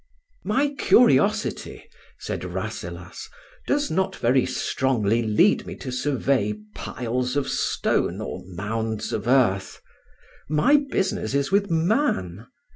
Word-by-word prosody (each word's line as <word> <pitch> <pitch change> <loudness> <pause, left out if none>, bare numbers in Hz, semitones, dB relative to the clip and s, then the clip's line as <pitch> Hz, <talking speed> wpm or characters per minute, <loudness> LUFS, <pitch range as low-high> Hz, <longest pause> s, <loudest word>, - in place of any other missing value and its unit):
"My 280 +6 +1
curiosity," 215 -3 +3 0.3
said - - -5
Rasselas, - - -6 0.4
"does 290 0 0
not 190 +3 0
very 125 +2 +2
strongly 120 -4 0
lead 115 - +2
me - - -6
to 130 - -7
survey 125 -5 0 0.2
piles 125 +1 -3
of 145 -2 0
stone - - 0
or - - -5
mounds 110 +4 -3
of 110 +1 -3
earth. 120 -7 +2 0.7
My 155 - +4
business 185 - -1
is 140 0 0
with 200 0 +2
man. 160 - 0
130 Hz, 115 wpm, -24 LUFS, -, 0.7 s, My